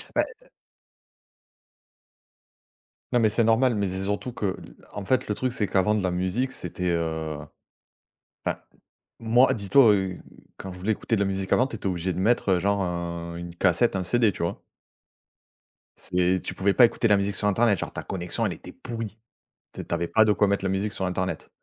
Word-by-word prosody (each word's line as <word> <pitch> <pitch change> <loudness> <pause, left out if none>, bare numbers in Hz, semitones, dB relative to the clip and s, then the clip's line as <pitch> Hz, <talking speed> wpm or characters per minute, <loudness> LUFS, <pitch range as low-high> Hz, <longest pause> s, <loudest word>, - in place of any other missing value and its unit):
Bah, - - +4 0.2
heu - - -24 2.6
Non, 125 - +4
mais 110 -2 +4
c'est 115 +3 +2
normal, 115 +3 +3
mais 100 -2 0
c'est 95 +1 -3
surtout 100 +5 -2
que 100 -5 -2
l - - -13 0.2
en 105 - -6
fait, 130 +4 +1
le 105 - -1
truc 130 +3 -2
c'est 115 -5 0
qu'avant 100 +2 +2
de 105 - -1
la 90 -1 0
musique 95 +9 -1
c'était, 90 -6 -3
heu 80 -2 -2 1.1
enfin, - - -1 0.6
moi, 120 +3 +4
dis-toi, 110 +2 +5
heu, 95 -2 -1 0.4
quand 95 - -8
je 90 - -10
voulais 105 +4 +1
écouter 115 - -1
de - - -2
la - - +2
musique 95 -1 -3
avant, 125 - +4
tu 120 - -7
étais 105 - -10
obligé 90 0 -1
de 90 - -4
mettre, 110 +2 +2
heu, 90 - +3
genre 100 +1 +1
un 85 -1 -4
une 85 0 -7
cassette, 90 +5 +2
un 95 - -2
CD, 110 +4 +3
tu - - -8
vois? 85 - -2 1.4
C'est 90 0 0
tu - - -5
pouvais 95 +1 +1
pas 125 - +7
écouter 115 0 +2
la 105 - +5
musique 100 0 -1
sur 105 - -2
internet, 105 -1 +3
genre - - -5
ta - - -5
connexion 90 -2 -2
elle - - -1
était - - -10
pourrie. 115 -2 -7 0.5
Tu - - -8
es - - -5
tu - - -3
avais 85 0 -2
pas 110 +6 +5
de 105 - +4
quoi 105 - +3
mettre 100 0 0
la - - +1
musique 95 +2 -1
sur 95 - -3
internet. 90 0 -3
100 Hz, 210 wpm, -25 LUFS, 90-110 Hz, 2.6 s, pas